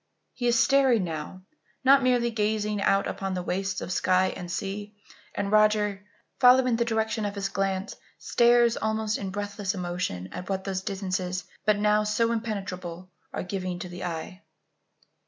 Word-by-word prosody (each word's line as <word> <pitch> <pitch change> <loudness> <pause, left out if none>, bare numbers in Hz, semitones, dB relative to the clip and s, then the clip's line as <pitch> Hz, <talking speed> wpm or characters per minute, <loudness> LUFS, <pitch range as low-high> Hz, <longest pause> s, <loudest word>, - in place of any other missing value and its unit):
He 245 - -2
is 240 0 +3
staring 265 -6 +4
now 165 +2 -6 0.4
not 270 +1 +6
merely 245 -2 +2
gazing 210 -1 0
out 195 0 +3
upon 195 -1 -3
the 180 - -3
wastes 185 +1 -2
of - - -5
sky 185 +1 +2
and 175 -1 -7
sea; 205 +3 -4 0.4
and 200 0 -2
Roger, 210 -1 +3 0.4
following 255 -1 +6
the 235 - +1
direction 220 -1 -1
of 205 0 -3
his 200 -1 -2
glance, 195 -1 -2 0.2
stares 240 -1 +4
also 220 0 -1
in 195 - -3
breathless 205 0 -3
emotion 175 - -3
at 180 - -7
what 190 -1 -1
those 190 -1 -2
distances, 185 -2 -3 0.2
but 210 -1 +4
now 210 0 +3
so 230 +2 +1
impenetrable, 185 -6 -4 0.2
are - - -4
giving 185 -1 -3
to 180 - -7
the 175 +1 -7
eye. 175 +3 -5
200 Hz, 160 wpm, -27 LUFS, 185-220 Hz, 0.4 s, not